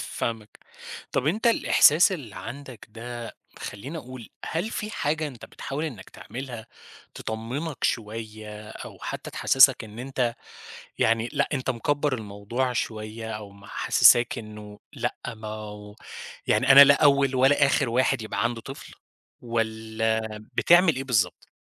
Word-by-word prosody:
فاهمك. 110 -2 -5 0.5
طَب 135 - 0
أنت 215 +9 +1
الإحساس 180 -6 +5
اللي 130 - -7
عندك 130 +4 -9
ده 120 0 -8 0.2
خلّيني 135 +11 -7
أقول، 130 -3 -10 0.2
هل 175 +8 -2
في 215 0 -4
حاجة 155 -4 -1
أنت 125 -5 -11
بتحاول 145 +4 -5
إنّك 115 -12 -7
تعملها 120 -3 -8 0.5
تطمِّنك 125 +8 -5
شوية 110 -1 -4
أو - - -10
حتّى - - -6
تحسِّسك 135 -3 +5
إن 110 +2 -12
أنت 125 -2 -1 0.6
يعني 115 +1 +2
لأ، - - +1
أنت 130 -1 -2
مِكَبّر 145 +3 0
الموضوع 110 +4 -3
شوية 110 -1 -4
أو 105 -2 -7
محسِّساك 100 +4 +3
إنه 105 -1 -10
لأ، - - -3 0.2
ما 110 0 -8
هو 105 -1 -8 0.5
يعني 130 +1 +4
أنا 140 +1 +11
لا 140 - +6
أول 140 -2 +4
ولا 135 +2 +4
آخِر 135 -2 +1
واحد 130 0 +1
يبقى 110 - -2
عنده 115 -1 -1
طفل 135 +4 -10 0.5
والّا 110 -1 -1 0.4
بتعمِل 175 -3 +5
إيه 135 - -3
بالضبط؟ 100 -9 0
120 Hz, 135 wpm, -25 LUFS, 110-135 Hz, 0.6 s, أنا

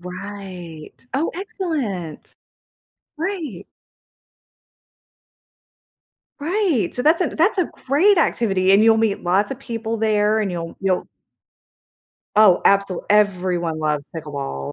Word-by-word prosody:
Right. 180 -3 -8 0.2
Oh, 295 +5 0
excellent! 310 - -4 0.9
Right. 330 - -4 2.8
Right, 325 - 0
so 250 - -2
that's 315 +5 +4
a 350 - 0
that's 375 +6 +1
a 360 - +2 0.2
great 335 +9 +4
activity, 195 - +2
and 200 +2 +6
you'll 225 0 +5
meet 220 -3 0
lotsa 200 +8 0
people 230 -3 -4
there, 215 0 +2
and 200 - -1
you'll 170 -1 -6
you'll 190 -2 0 1.3
Oh, 210 -4 +6
absolu 195 -2 +3
everyone 180 -5 +1
loves 150 -2 -1
pickleball. 140 - -5
205 Hz, 105 wpm, -21 LUFS, 180-275 Hz, 2.8 s, and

